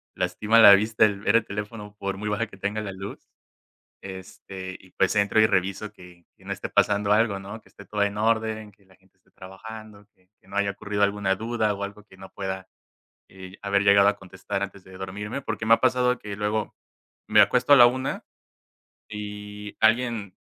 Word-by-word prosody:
lastima 110 +2 +2
la 105 -3 +10
vista 110 +2 +1
el 100 -2 -1
ver 105 +2 +1
el 115 - -1
teléfono 105 0 -7
por 100 0 -3
muy 105 +2 -4
baja 105 +2 -1
que - - -14
tenga 100 +2 -3
la 100 - -5
luz. 95 +1 -8 0.8
Este, 95 0 -9
y 95 - -19
pues 95 +2 +1
entro 100 +1 +3
y 110 - +6
reviso 100 +2 -1
que 90 -3 -16
que - - -22
no - - -4
esté - - -5
pasando 105 0 +2
algo, 105 -2 +2
¿no? 100 +3 -9
Que - - -24
esté 100 - -15
todo 105 0 -2
en 100 0 0
orden, 110 -1 0
que 100 0 -29
la 95 -1 -23
gente 95 0 -32
esté 95 - -34
trabajando, 105 +2 -11
que 90 0 -33
que - - -26
no 100 - -9
haya 100 0 +1
ocurrido 105 0 -3
alguna 100 -1 0
duda 110 0 -1
o 100 - -4
algo 100 +1 -8
que 95 - -19
no 95 0 -12
pueda, 95 -1 -5 0.6
eh, 95 +1 -12
haber 100 0 +1
llegado 100 0 +6
a 100 - +3
contestar 95 +1 -6
antes 100 -1 -8
de 95 - -15
dormirme, 105 +7 -5
porque 110 - -4
me 115 - +6
ha - - +3
pasado 125 -1 +2
que 105 -1 -7
luego 105 +1 -2 0.5
me - - +6
acuesto - - +3
a - - +10
la 120 - +9
1:00 130 +2 -2 0.9
y 105 0 -8
alguien, 115 -3 +1
105 Hz, 205 wpm, -25 LUFS, 95-110 Hz, 0.9 s, la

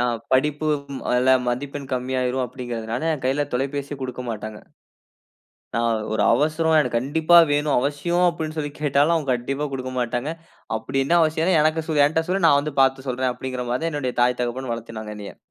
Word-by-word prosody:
நான் 120 -2 0
படிப்பு 150 +3 +2 0.3
ம் 135 - -5
அதுல 125 +1 +3 0.2
மதிப்பெண் 140 +2 -4
கம்மியாகிடும் 130 0 -1
அப்படிங்கிறதுனால, 120 -2 -5
என் 135 - -9
கையில 135 +3 +1
தொலைபேசியே 140 +2 -2
குடுக்கமாட்டாங்க. 115 -4 -5 1.2
நான் 115 0 +1 0.3
ஒரு - - +1
அவசரம் 155 +4 +2
எனக்கு 125 -4 -1
கண்டிப்பா 160 +6 +3
வேணும், 145 0 +1
அவசியம் 170 +6 +1
அப்படினு 160 -2 -5
சொல்லி 145 -1 -2
கேட்டாலும் 145 +3 +3
அவங்க 145 -5 -1
கண்டிப்பா 135 +5 -3
குடுக்க 130 -1 -4
மாட்டாங்க, 120 +5 -2 0.5
அப்படி 135 +4 -3
என்ன 170 - +2
அவசியம், 160 +3 +2
எனக்கு 155 0 +1
சொ 155 - 0
என்ட்ட 160 +1 -1
சொல்லு, 185 -2 +1
நான் 145 -2 +5
வந்து 150 -1 -5
பார்த்து 135 0 +1
சொல்றேன், 130 0 0
அப்படின்கின்ற 130 -1 -5
மாதிரி 125 +6 -1
தான் 165 - -1
என்னுடைய 130 -4 -2
தாய் 125 0 +2
தகப்பன் 125 +1 -3
வளர்த்தினாங்க 110 -2 -7
என்னைய 100 -1 -9
135 Hz, 170 wpm, -23 LUFS, 125-150 Hz, 1.2 s, நான்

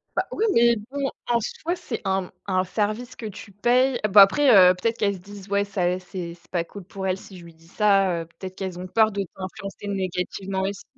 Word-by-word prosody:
Bah, - - 0
oui 445 - 0
mais 235 0 +5 0.2
bon, 280 -1 -1 0.2
en 235 -1 +2
soi, 335 +10 -3
c'est 235 -9 -5
un, 190 0 +1
mmh, - - -12 0.2
un 185 -1 +2
service 215 +6 -2
que 225 - -8
tu 205 0 -8
payes 245 +5 +2
Bon, 205 - +8
après, 275 +9 +7
heu, 180 -1 +8
peut-être 230 +5 -1
qu'elles 200 -1 +1
se - - -10
disent: 200 +1 -12
«Ouais, 200 0 +1
ça, 180 -2 0
c'est 180 -2 -7
c'est 175 - -27
pas 175 -2 0
cool 200 +2 -11
pour 190 +1 -5
elle, 185 0 0
si 190 - -13
je - - -13
lui 165 - -13
dis, 165 +1 -22
ça, 195 -4 +2
heu» - - -7
peut-être 185 -1 -7
qu'elles 190 -2 -5
ont 180 - -6
peur 220 +2 +3
de 200 0 -2
t'influencer 195 +2 -7
négativement 190 0 -3
aussi. 195 +1 -3
195 Hz, 235 wpm, -24 LUFS, 185-215 Hz, 0.2 s, Bon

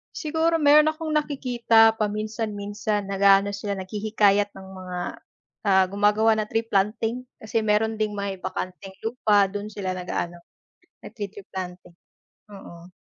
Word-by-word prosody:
Siguro 325 +1 0
meron 300 +1 +6
akong 315 +1 -7
nakikita 240 -6 +3
paminsan-minsan 210 -1 -3
nag-aano 200 0 +4
sila, 200 -1 -4
naghihikayat 205 +1 +1
ng 190 -1 -12
mga 180 -1 -6 0.7
ah, 190 -2 +4
gumagawa 210 +3 +3
na 215 - 0
tree 225 +2 -2
planting, 220 +4 0 0.2
kasi 220 +1 -2
meron 215 +1 +1
ding 215 -1 -1
may 200 -1 -3
bakanteng 185 +1 -6
lupa 215 -4 +2
dun 205 +2 -6
sila 190 -3 -4
nag-aano, 180 -1 -4 0.7
nagti-tree 200 -2 -8
planting, 180 -2 -7 0.6
oo. 175 -3 -12
210 Hz, 125 wpm, -24 LUFS, 195-225 Hz, 0.7 s, meron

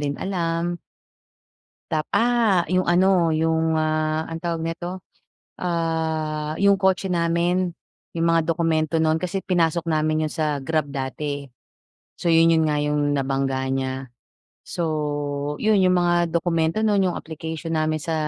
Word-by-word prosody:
din 145 -1 -2
alam. 175 -2 -2 1.1
Tap 155 -1 -1
ah, 235 0 +3 0.2
'yong 185 0 +2
ano, 180 +2 +4 0.3
'yong, 160 0 +1
ah, 155 0 0
anong 165 - -4
tawag 170 -2 -2
nito? 165 +1 -4 0.7
Ah, 160 -3 -2
'yong 200 0 +5
kotse 190 0 +2
namin, 175 +1 +1 0.5
'yong 165 - +1
mga 165 0 +3
dokumento 160 -1 0
no'n, 160 0 +2
kasi 180 +2 -2
pinasok 170 -1 +2
namin 155 0 +1
'yon 155 - -6
sa 150 -2 0
Grab 155 -3 0
dati, 135 +1 -5 0.2
eh. 125 - -26 0.7
So - - 0
'yon, 165 0 +5
'yon 160 -1 +3
nga 150 - +1
'yong 150 0 0 0.2
nabangga 135 0 -1 0.2
niya. 130 0 -2 0.6
So - - -7 0.8
'yon, 215 -2 +3
'yong 185 -1 +4
mga 175 0 +2 0.2
dokumento 165 +1 0
no'n, 205 -2 +3
'yong - - -4
application 160 +1 -6
namin 155 0 0
sa 160 +2 -3
165 Hz, 145 wpm, -23 LUFS, 155-175 Hz, 1.1 s, yong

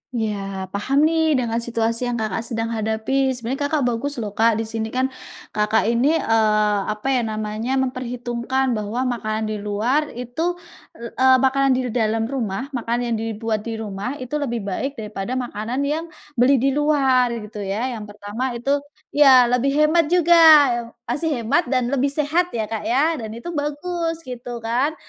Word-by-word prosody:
Iya 200 -4 -3
paham 270 +9 +1
nih 320 -1 +3
dengan 235 -2 0
situasi 230 +1 -1
yang 240 - -1
Kakak, 220 0 -2
sedang 230 0 -3
hadapi. 225 +5 0
Sebenarnya 245 +3 -4
Kakak, 295 -3 0
bagus 245 +4 -1
loh 205 - -4
Kak, 225 +1 +3
disini 225 0 -3
kan, 260 +3 -1 0.4
Kakak, 210 +1 +1
ini, 270 +7 +3
eee, 215 -5 +2
apa 215 +4 -3
ya 255 -2 +2
namanya 215 +4 -2
memperhitungkan 250 0 -1
bahwa 220 +3 -2
makanan 220 -3 -2
di 210 - -3
luar 225 +9 0
itu, 280 +9 -2 0.4
eee, 260 +3 +3
makanan 275 0 +3
di 260 - 0
dalam 225 -1 0
rumah 250 +1 -3
makanan 240 -1 -2
yang 235 -1 -1
dibuat 225 0 -3
di 225 - -3
rumah 220 +4 -4
itu 255 -1 -8
lebih 235 -6 -2
baik 270 +9 -3
daripada 215 +2 -5
makanan 245 +1 -3
yang 310 +4 -2 0.3
beli 265 +3 +5
di 270 +2 +2
luar 275 -4 +3 0.2
gitu 210 0 -9
ya 220 +7 -2
yang - - -7
pertama 210 +5 -4
itu 275 +4 0 0.3
iya 270 -4 +7
lebih 255 +3 +2
hemat 305 +1 +3
juga, 345 0 +4 0.7
masih 270 0 -2
hemat 325 +10 +1
dan 255 -1 0
lebih 280 0 +2
sehat 305 +5 0
ya 220 - 0
Kak, 220 - -3
ya 295 +5 +2
dan 220 - -5
itu 345 +9 -6
bagus 330 +2 -3
gitu 240 -2 -7
kan. 255 +7 0
245 Hz, 165 wpm, -21 LUFS, 220-275 Hz, 0.7 s, iya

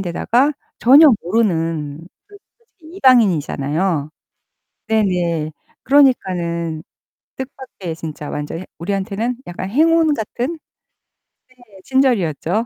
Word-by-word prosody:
데다가 235 - +1 0.3
전혀 285 +6 +7
모르는 165 -7 -1 0.3
그 410 - -15 0.2
솔직히 375 -7 -17
이방인이잖아요. 165 - +2 0.8
네네. 175 -7 0 0.3
그러니까는 175 - +1 0.5
뜻밖의 255 -10 -7
진짜 155 -2 -7
완전 150 +2 -5
해 185 - -8
우리한테는 200 +6 -2
약간 180 +2 -6
행운 320 +4 +3
같은? 245 +6 -3 1.1
네. 195 -3 -17
친절이었죠. 220 - +1
195 Hz, 240 characters per minute, -19 LUFS, 165-260 Hz, 1.1 s, 전혀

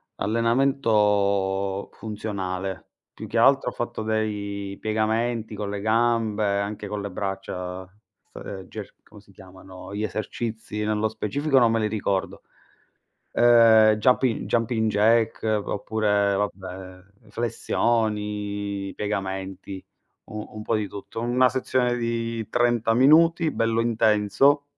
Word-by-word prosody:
allenamento 105 -5 +1
funzionale. 95 -3 -5 0.3
Più - - -8
che 115 +3 -3
altro 135 +4 +4
ho - - -10
fatto 120 -2 -4
dei 100 -2 -3
piegamenti 110 +1 -1
con 100 -1 -4
le 100 0 -4
gambe, 110 -2 +1
anche 105 0 -4
con 105 0 -4
le 100 - -4
braccia, 95 -1 -5 0.5
st 95 -2 -8
ger - - -8
come 105 -1 -16
si 100 - -22
chiamano? 95 0 -12
Gli 105 - -2
esercizi 110 +1 -4
nello 105 0 0
specifico 130 +7 -1
non 120 -3 +5
me 115 - +1
li 110 - +1
ricordo. 100 -3 -2 0.9
Uhm, 115 -2 +6
juppi 125 +2 +2
jumping 115 -1 0
jack, 110 +2 +2
oppure, 105 -1 0
vabbè, 95 +1 -6
flessioni, 105 -3 -1
piegamenti, 95 -2 -4 0.4
u 105 0 -7
un 105 - -7
po' 115 - 0
di 105 -1 -1
tutto. 100 +3 -7
Una 125 +2 +3
sezione 125 -1 0
di 115 -1 -3
30 120 -2 +2
minuti, 160 +6 +5
bello 115 0 0
intenso. 115 +5 +3
110 Hz, 120 wpm, -24 LUFS, 100-115 Hz, 0.9 s, Uhm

